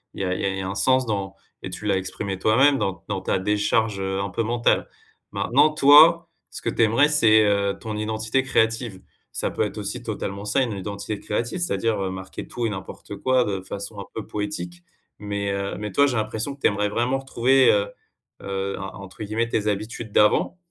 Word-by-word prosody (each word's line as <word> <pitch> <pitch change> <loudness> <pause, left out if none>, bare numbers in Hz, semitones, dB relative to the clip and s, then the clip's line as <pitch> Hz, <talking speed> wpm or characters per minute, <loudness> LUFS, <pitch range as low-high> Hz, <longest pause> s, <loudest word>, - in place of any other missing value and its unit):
il - - -5
y - - 0
a 90 - 0
il 95 +1 -2
y - - -3
a 95 - -4
un 95 - -3
sens 130 +4 +3
dans 100 -3 -3 0.3
et - - -6
tu 105 - -8
l'as 100 -2 +2
exprimé 95 +1 -4
toi-même, 135 +8 +4
dans 95 -1 -2
dans 100 -2 -3
ta 95 - 0
décharge, 105 +2 0
heu, 95 0 -2
un 100 +1 -2
peu 105 - -1
mentale. 120 +1 +1 0.4
Maintenant, 145 +5 +3
toi, 155 +3 +7 0.2
ce - - -9
que - - 0
tu - - -1
aimerais, 115 +7 +4
c'est, 110 -7 +5
heu, 100 -1 +1
ton 110 -1 -5
identité 110 +3 -1
créative. 115 -5 0 0.3
Ça - - -2
peut - - 0
être - - -4
aussi - - -4
totalement 100 +1 -5
ça, 135 +6 +1
une 125 -3 0
identité 100 +1 -5
créative, 120 +10 -3
c'est-à-dire, 110 - 0
heu, 95 - -1
marquer 95 0 -7
tout 120 - -3
et - - +1
n'importe 95 0 -7
quoi, 130 +2 +2
de 100 -3 -3
façon 100 +2 -7
un 100 - -6
peu 110 - -5
poétique. 90 -4 -5 0.4
Mais 100 -1 -3
heu 100 0 -3
mais 105 0 -5
toi, 140 +9 +4
j'ai 130 - -1
l'impression 110 +5 -3
que 140 - -29
tu - - +5
aimerais 105 0 0
vraiment 120 +5 0
retrouver, 135 0 +3
heu 100 0 +1 0.5
heu, 100 0 -3
en 95 -1 -7
entre 95 +2 -9
guillemets, 110 +3 -1
tes 105 -2 -1
habitudes 110 +2 -3
d'avant. 105 - +3
105 Hz, 210 wpm, -23 LUFS, 100-120 Hz, 0.5 s, toi